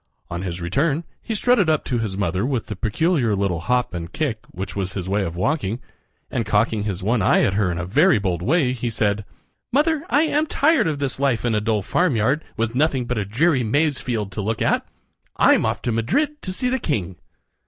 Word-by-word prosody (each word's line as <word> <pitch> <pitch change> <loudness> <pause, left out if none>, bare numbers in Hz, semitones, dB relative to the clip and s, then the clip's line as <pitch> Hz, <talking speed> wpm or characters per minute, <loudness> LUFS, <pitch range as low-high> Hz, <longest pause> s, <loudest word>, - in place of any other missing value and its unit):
On 85 +1 -3
his 90 -2 -4
return 140 - 0 0.2
he 225 - -4
strutted 215 -5 +3
up 155 -1 +2
to 125 -2 -1
his 105 -4 -3
mother 95 0 0
with 125 -4 -1
the 105 - -5
peculiar 120 - +1
little 95 -4 0
hop 125 +5 0
and 85 -1 -5
kick 140 -8 -2
which 95 +1 -6
was 95 -1 -2
his 95 -2 -4
way 100 +1 +1
of 85 -3 -4
walking, 115 - -1 0.5
and 120 - 0
cocking 105 0 +1
his 95 -3 -3
one 110 +3 +1
eye - - +4
at 95 - +2
her 95 -3 +1
in 85 - -3
a 90 - -3
very 150 - +4
bold 95 -4 -1
way, 140 -3 +2
he 120 -1 -3
said: 105 -2 0 0.5
"Mother, 300 +3 +2
I 290 - +4
am 310 0 +1
tired 295 - +3
of 155 -2 -1
this 140 -3 -2
life 135 -4 +1
in 120 - +1
a 105 - +1
dull 110 -1 0
f - - -13
farmyard, 140 -4 +1
with 115 0 -1
nothing 135 -2 +1
but 125 -1 -2
a 105 - -2
dreary 135 - +2
maize 145 +5 +1
field 110 -6 -3
to 105 - -4
look 110 +2 -2
at. - - +1 0.5
I'm - - +4
off - - -2
to 120 - 0
Madrid 285 - 0
to 185 - -4
see 250 +7 -1
the 260 +1 0
king." 95 - -2
115 Hz, 225 wpm, -22 LUFS, 100-155 Hz, 0.5 s, eye